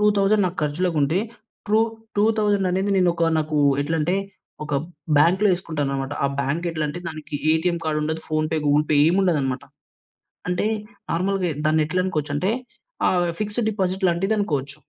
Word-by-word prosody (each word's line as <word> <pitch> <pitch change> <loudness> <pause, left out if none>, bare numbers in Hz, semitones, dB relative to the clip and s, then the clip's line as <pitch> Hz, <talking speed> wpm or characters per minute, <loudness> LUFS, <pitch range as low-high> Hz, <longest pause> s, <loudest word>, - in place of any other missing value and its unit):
2,000 205 0 +3
నాకర్చులకుంటే, 160 -1 0 0.5
true 215 +1 +3 0.4
two 205 - +4
థౌసండనేది 200 -2 +1
నేనొక, 175 -2 +2 0.2
నాకు 155 0 -1 0.3
ఎట్లంటే, 160 +4 0 0.5
ఒక 150 -1 -3 0.4
బ్యాంక్‌లో 185 +8 +4
ఎసుకుంటాననమాట. 145 -6 -3
ఆ - - +5
బ్యాంకెట్లంటే 155 +2 -2
దానికి 155 -2 -8 0.2
ఏటీఎం 170 +2 +1
కార్డుండదు, 155 0 -1
ఫోన్‌పే, 155 0 0
గూగుల్‌పే 150 +1 +3
ఏముండదనమాట. 165 -8 +1 0.9
అంటే 180 +3 0 0.5
నార్మల్‌గా 185 +1 0 0.2
దాన్నేట్లనుకోవచ్చంటే 155 +1 0 0.6
ఆహ్, 175 -1 +2
ఫిక్స్డ్ 215 +2 -1
డిపాజిట్ 190 -2 -1
లాంటిదనుకోవచ్చు. 170 -7 -1
170 Hz, 105 wpm, -23 LUFS, 150-190 Hz, 0.9 s, ఆ